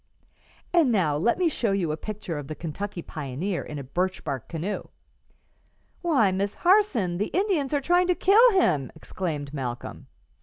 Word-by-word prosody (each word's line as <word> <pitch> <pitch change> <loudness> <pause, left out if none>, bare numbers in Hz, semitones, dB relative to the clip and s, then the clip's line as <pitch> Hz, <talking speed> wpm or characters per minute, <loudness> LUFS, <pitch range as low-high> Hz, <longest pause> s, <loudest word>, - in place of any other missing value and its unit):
"And 330 -8 +4
now 175 -9 +2
let 185 +11 +2
me 360 -1 +2
show 235 -9 0
you 180 -5 0
a - - -1
picture 180 -3 -5
of 140 - -8
the 155 - -5
Kentucky 175 +3 -5
pioneer 155 +6 -4
in 150 - -7
a 140 - -5
birch 180 +8 -2
bark 135 -6 -4
canoe." 175 +5 -3 1.2
"Why, 270 - +3
Miss 195 +2 -1
Harson, 285 - +3
the 210 - 0
Indians 360 -7 0
are 290 -1 +1
trying 350 +5 +3
to 360 - +2
kill 435 +8 +6
him!" 140 - +1
exclaimed 150 -6 -5
Malcolm. 125 -4 -5
190 Hz, 165 wpm, -26 LUFS, -, 1.2 s, kill